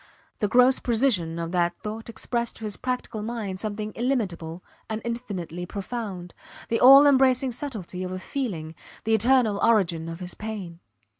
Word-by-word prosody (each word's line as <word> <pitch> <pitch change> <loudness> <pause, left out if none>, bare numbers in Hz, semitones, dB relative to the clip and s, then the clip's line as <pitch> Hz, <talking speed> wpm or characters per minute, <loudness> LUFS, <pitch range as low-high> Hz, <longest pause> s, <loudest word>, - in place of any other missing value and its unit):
The 210 - +1
gross 250 +4 +5
precision 220 -9 +1
of 170 0 -4
that 175 -1 +1
thought 220 +2 -6
expressed 235 0 -2
to - - -9
his 210 -2 -1
practical 250 -3 -3
mind 215 -4 -4
something 215 0 -4
illimitable 185 -10 -2 0.3
and 220 0 -2
infinitely 190 -8 -5
profound, 195 -3 -5 0.4
the 230 - +1
all 275 +3 +9
embracing 265 -2 +4
subtlety 220 -9 -5
of 185 0 -4
a 185 - -3
feeling, 185 - -4 0.3
the 225 - +1
eternal 225 -2 +3
origin 170 -8 +2
of 165 +1 -7
his 180 -1 -5
pain. 200 -6 -7
215 Hz, 155 wpm, -25 LUFS, 180-240 Hz, 0.4 s, all